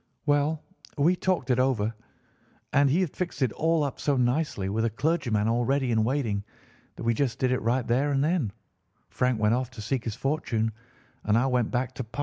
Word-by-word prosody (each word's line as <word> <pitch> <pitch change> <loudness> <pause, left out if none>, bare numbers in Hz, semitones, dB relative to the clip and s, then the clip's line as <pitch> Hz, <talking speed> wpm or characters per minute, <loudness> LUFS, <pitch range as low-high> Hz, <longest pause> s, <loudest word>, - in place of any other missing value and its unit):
Well, 145 +1 +1 0.3
we 160 +6 +4
talked 180 -6 0
it 125 - +2
over, 115 -4 +1 0.8
and 140 0 +5
he 165 +8 +3
had 175 -6 0
fixed 180 -6 -3
it 125 - +1
all 160 +2 +1
up 140 - -3
so 145 -2 +1
nicely, 125 -4 0
with 110 +3 0
a 115 - +2
clergyman 115 -4 0
all 120 +2 +2
ready 135 0 +1
in 110 -1 +3
waiting, 115 -5 0 0.5
that - - -8
we 115 0 +2
just 125 0 -1
did 130 -1 +1
it 130 - 0
right 120 +2 +1
there; 130 +5 +1
and 135 0 +2
then 155 - +1 0.6
Frank 125 -3 +1
went 105 +1 +3
off 125 0 0
to 120 -4 -10
seek 130 +2 -1
his 110 -3 -3
fortune, 125 -5 -1 0.5
and 105 +1 +3
I 120 - +3
went 125 -4 +1
back 130 +1 -1
to 130 - -4
Pa. 115 +5 -10
130 Hz, 210 wpm, -27 LUFS, 115-145 Hz, 0.8 s, and